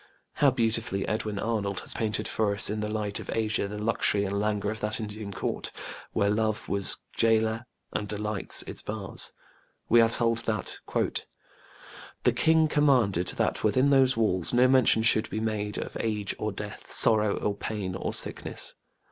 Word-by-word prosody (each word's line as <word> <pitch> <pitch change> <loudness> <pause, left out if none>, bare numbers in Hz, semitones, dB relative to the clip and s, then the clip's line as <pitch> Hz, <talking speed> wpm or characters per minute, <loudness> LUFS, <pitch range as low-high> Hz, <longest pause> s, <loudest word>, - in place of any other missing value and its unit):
How 145 - +5
beautifully 115 -5 0
Edwin 105 -1 -2
Arnold 100 -3 -2
has - - -2
painted 110 -1 -2
for 105 -2 0
us 100 - +7
in 105 - -2
The 105 0 -2
Light 105 -1 -3
of - - -9
Asia 110 -2 0
the 105 +1 -6
luxury 105 -1 +1
and 100 +1 -2
languor 105 0 -1
of 110 - -6
that 105 +1 -2
Indian 105 -1 -6
Court, - - -2 0.4
"where 100 0 +1
love 110 0 -1
was 100 -1 -1 0.2
gaoler 115 +1 +2 0.3
and 105 - -2
delights 105 -1 0
its - - -5
bars". 105 -3 -3 0.6
We 120 +1 +6
are 115 - +4
told 115 -1 +2
that: 110 -3 -3 1.4
The - - +3
king 160 -1 +3
commanded 125 - +2
that - - -1
within 130 +6 +3
those 135 -2 +4
walls 95 -5 +2
No 125 +1 +6
mention 130 -4 +4
should 110 -1 +3
be 110 - -3
made 105 -2 -2
of - - -5
age 105 -3 -1
or - - -2
death - - -8
Sorrow 105 -2 +3
or 105 - -1
pain, 100 -3 -4
or 95 - -3
sickness - - -2
110 Hz, 170 wpm, -27 LUFS, 105-115 Hz, 1.4 s, us